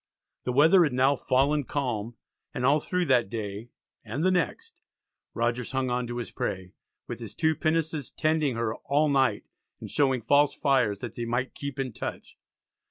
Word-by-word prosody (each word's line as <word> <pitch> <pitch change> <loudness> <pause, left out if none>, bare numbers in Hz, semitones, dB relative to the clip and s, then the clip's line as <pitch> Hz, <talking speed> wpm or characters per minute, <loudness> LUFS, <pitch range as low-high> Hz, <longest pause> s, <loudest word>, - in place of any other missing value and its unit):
The 125 - 0
weather 160 +8 +6
had 150 -5 0
now 130 +3 +3
"fallen 140 +3 +1
calm," 120 -5 -3 0.4
and 125 - -1
all 145 +3 +4
through 180 +3 -1
that 125 - +3
day 105 +1 -5 0.3
and 115 +8 -3
the 185 - +4
next 185 - -2 0.5
Rogers 120 +2 -1
hung 130 -1 0
on 125 0 -1
to 120 0 -5
his 120 - -5
prey, 95 -1 -4 0.3
with - - -6
his - - -8
two 160 0 +2
pinnaces 155 -2 -1
tending 155 -4 0
her 115 -1 -1
"all 150 +2 +1
night," 130 -6 +2 0.4
and - - -8
showing 135 -5 +2
"false 145 +4 +3
fires" 130 -7 +2
that - - -5
they 120 - -4
might 120 +3 -2
keep 140 -1 -6
in 130 -3 -3
touch. - - -6
130 Hz, 175 wpm, -27 LUFS, 120-145 Hz, 0.5 s, weather